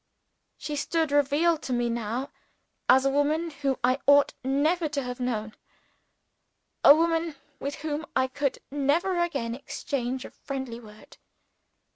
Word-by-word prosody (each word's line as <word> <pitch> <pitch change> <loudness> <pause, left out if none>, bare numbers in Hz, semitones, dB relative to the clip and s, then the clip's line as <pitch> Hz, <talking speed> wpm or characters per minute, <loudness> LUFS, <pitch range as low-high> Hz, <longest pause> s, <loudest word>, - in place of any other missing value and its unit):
She 300 - -5
stood 320 +1 0
revealed 290 +3 +3
to 255 - -3
me 240 0 +1
now 235 +3 -3 0.6
as 265 +1 +6
a - - +4
woman 305 +4 +1
whom 275 -2 -1
I 255 +2 +3
ought 285 0 +6
never 305 +5 +1
to 285 -2 -2
have 250 0 -5
known 220 -4 -2 1.3
a 285 - +10
woman 330 -1 +1 0.2
with 280 +1 -4
whom 310 +1 -3
I 260 - +3
could 275 +1 -2
never 330 +6 +1
again 275 -9 -1
exchange 260 -1 -4
a - - -10
friendly 265 -4 -6
word. 215 -2 -15
280 Hz, 140 wpm, -27 LUFS, 255-305 Hz, 1.3 s, a